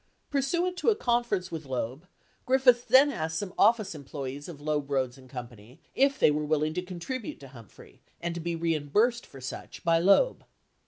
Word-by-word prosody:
Pursuant 340 +6 0
to - - +2
a 440 - +4
con 240 -6 +1
ference 185 -6 -3
with 160 -1 -5
Loeb, 130 +6 -4 0.4
Griffiths 255 -2 +4
then 275 +2 +6
asked 160 - -3
some 190 +1 -4
office 215 -2 +3
employees 140 0 -7
of 160 -4 -9
Loeb, 145 -1 -2
Rhoades, 130 -3 0
and 130 -1 -16
Co. 125 -2 -6 0.5
if 275 +1 +3
they - - +5
were 150 +1 -1
willing 155 0 0
to 180 - -2
contribute 185 +6 -6
to 135 - -11
Humphrey 115 -6 -15 0.2
and 170 0 -3
to 170 - -5
be 170 +1 -2
reimbursed 165 - +1
for 135 - -12
such 130 +1 -8
by 165 -2 +3
Loeb. 200 - +4
170 Hz, 190 wpm, -28 LUFS, 145-235 Hz, 0.5 s, then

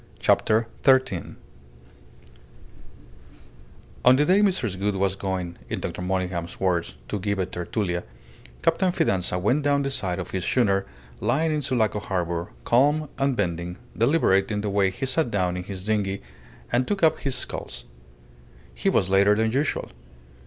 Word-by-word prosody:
CHAPTER 110 +1 +3 0.2
THIRTEEN 130 -10 +2 2.7
On 125 +1 +7
the 145 +3 +3
day 185 +5 +4
Mrs. 180 - +1
Gould 100 0 0
was 95 0 +1
going, 95 -3 -4
in - - -2
Dr. - - -5
Monygham's 90 -2 -2
words, 90 -3 0
to 105 - -3
"give 100 +1 -1
a 95 - 0
tertulia," 90 0 -3 0.6
Captain 170 +2 +2
Fidanza 95 - 0
went 125 +11 +2
down 140 0 +2
the 140 - -2
side 95 -8 -1
of 90 - -5
his 95 -2 -2
schooner 100 -5 +2 0.3
lying 155 +8 +1
in 150 - 0
Sulaco 115 -6 +1
harbour, 85 -3 -2 0.2
calm, 145 +5 +3
unbending, 90 -10 -1 0.2
deliberate 115 -6 +3
in 105 -1 -1
the 105 -1 -2
way 100 -1 +3
he 120 +8 -4
sat 130 +1 +1
down 90 -4 0
in 90 0 -5
his 95 -1 -7
dinghy 100 -4 -1 0.5
and 125 +1 +1
took 200 -3 -1
up 160 - +4
his 135 -2 -2
sculls. - - -5 0.9
He - - 0
was 95 - +1
later 100 +2 +5
than 110 +1 +1
usual. 140 +4 -1
105 Hz, 150 wpm, -25 LUFS, 95-130 Hz, 2.7 s, On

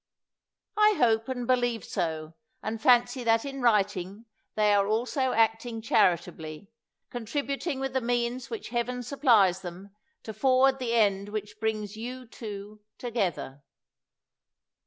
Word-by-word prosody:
I 425 0 +6
hope 225 0 +2
and 250 -2 -3
believe 245 -2 +1
so, 160 -3 -3 0.3
and 220 0 -4
fancy 245 0 +4
that 225 +1 +2
in 275 -1 -5
writing 205 -2 +1 0.3
they 210 -1 +3
are 200 -1 +3
also 250 +5 0
acting 225 +1 +1
charitably, 180 -4 0 0.4
con 240 -2 -5
tributing 280 +3 -2
with 270 -1 -3
the 260 - +1
means 240 +1 -1
which 445 -3 -6
Heaven 245 +1 -2
supplies 230 -9 +3
them 190 +2 -9 0.3
to 220 - -7
forward 265 +2 +3
the 235 -2 -1
end 200 -3 +2
which 210 0 -6
brings 215 -1 -2
you, 250 +3 -6
too, 210 -2 -9 0.2
together. 190 - -3
225 Hz, 135 wpm, -28 LUFS, 205-250 Hz, 0.4 s, I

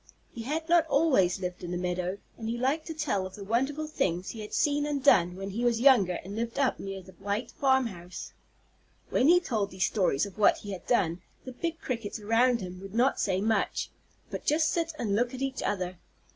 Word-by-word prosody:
He 235 - -6
had 310 +7 -3
not 340 -1 +4
always 265 - +3
lived 180 -1 -5
in 175 - -5
the 175 - -2
meadow, 180 +1 -2 0.2
and 225 -1 -5
he 235 - -2
liked 275 +6 0
to 325 - -4
tell 245 -12 -1
of 185 - -12
the 205 - -8
wonderful 270 +9 0
things 185 - -1
he 225 - -9
had 210 - -8
seen 290 -2 +1
and 285 -2 -2
done 180 -9 +5
when 195 +1 -5
he 230 +5 -3
was 235 -2 +2
younger 230 -9 +5
and 195 +3 -7
lived 230 +2 -3
up 275 -2 +1
near 195 -1 -6
the 190 - -14
white 205 +4 -2
farm 265 -2 +2
house. 180 -4 -8 0.8
When 260 - +3
he 350 +2 +7
told 220 - -1
these 185 -1 -2
stories 180 -7 +2
of 200 +1 -11
what 205 - +5
he 205 - -8
had 185 -3 -7
done, 175 -7 +1 0.2
the 260 - -6
big 325 +6 -4
Crickets 230 -4 -4
around 235 +3 +3
him 180 0 -7
would 195 +1 -9
not 255 +4 +3
say 190 -1 +1
much, 220 +1 0 0.4
but - - -5
just 310 +1 +2
sit 330 -1 0
and 210 -8 0
look 245 +3 0
at 255 - -7
each 270 -1 -2
other. 185 -3 -2
225 Hz, 225 wpm, -29 LUFS, 190-270 Hz, 0.8 s, he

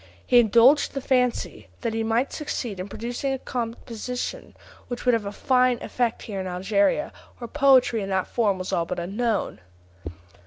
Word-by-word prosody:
He 245 - +6
indulged 240 +7 +5
the - - -1
fancy 250 -2 0
that 230 -2 -2
he 225 - -1
might 230 +4 0
succeed 240 -9 -4
in 185 - -4
producing 240 +6 -3
a - - -2
composition 245 - -5 0.3
which 245 +1 -6
would 250 - +4
have 220 -3 0
a - - -4
fine 250 +2 +2
effect 240 -2 -1
here 200 -3 -5
in 185 - -5
Algeria, 200 +7 0 0.2
where 240 - -7
poetry 260 -4 +4
in 195 - -4
that 190 -1 0
form 210 -5 0
was 185 0 -5
all 170 - +1
but 180 - -4
unknown. 205 +5 -2
235 Hz, 170 wpm, -24 LUFS, 200-250 Hz, 0.3 s, He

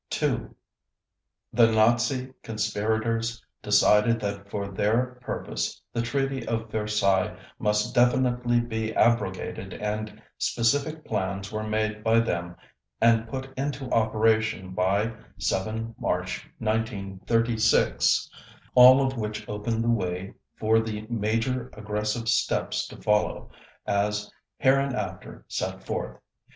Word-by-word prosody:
2. - - -1 1.0
The 115 -2 +5
Nazi 120 +4 +2
conspirators 110 +2 -1 0.2
decided 105 +2 +4
that 100 -1 -4
for 100 -1 -3
their 120 +6 0
purpose - - -3
the 115 - 0
Treaty 135 +1 -1
of 115 -1 -2
Versailles 105 -4 +1 0.2
must 105 -1 +1
definitely 125 -1 +3
be 110 -2 -3
abrogated 120 0 0
and 105 0 -4 0.2
specific 145 +7 0
plans 95 +1 -3
were 110 0 -3
made 110 0 -1
by 115 0 +4
them 85 -6 -2 0.4
and 115 -1 +4
put 135 +3 -6
into 135 -1 -3
operation 110 -3 +2
by 100 +5 +1 0.2
7 110 +4 -2
March - - -2
1936, 110 +1 +1 0.5
all 130 +2 +8
of 130 0 -2
which 110 -1 -4
opened 110 +2 -2
the 120 - +2
way 90 -3 -2 0.2
for 110 +1 +3
the 110 -1 -4
major 115 +3 -1
aggressive 105 +2 -3
steps 120 +2 +1
to - - -11
follow, 105 0 0 0.3
as 105 +1 0 0.3
hereinafter 135 0 0
set - - -4
forth. - - -4
110 Hz, 110 wpm, -26 LUFS, 105-120 Hz, 1.0 s, all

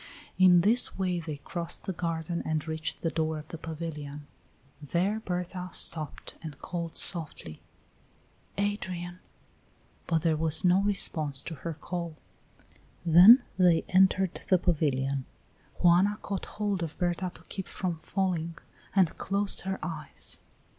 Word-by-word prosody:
In 180 -2 +7
this 225 +7 +4
way 180 -2 0
they 160 -3 -6
crossed 170 +3 -4
the 190 - -3
garden 170 0 -3
and 155 0 -2
reached 160 0 -3
the 165 - -1
door 160 -1 -1
of 155 +1 -10
the 165 - -7
pavilion. 150 -3 -6 0.6
There 180 +8 0
Berta 180 -2 -4
stopped, 155 -3 0
and 155 -4 -8
called 170 0 -5
softly: 150 - +1 1.0
"Adrian!" 185 -3 -3 0.9
But 165 -2 +1
there 165 -2 +2
was 160 +2 +3
no 180 +2 +5
response 155 -8 +1
to 170 - -6
her 160 +2 -6
call. 170 0 -5 0.9
Then 180 - +9 0.2
they 175 -3 +4
entered 190 -1 +3
the 185 - +5
pavilion. 140 -6 0 0.6
Juana 180 +4 +5
caught 195 -1 -4
hold 205 -3 -1
of 165 -2 -5
Berta 175 +1 -1
to - - -13
keep 190 -2 -7
from 175 -4 -4
falling, 170 -2 -2 0.4
and 185 -5 +3
closed 200 +1 0
her 190 0 -3
eyes. 155 -4 -5
170 Hz, 135 wpm, -28 LUFS, 160-185 Hz, 1.0 s, Then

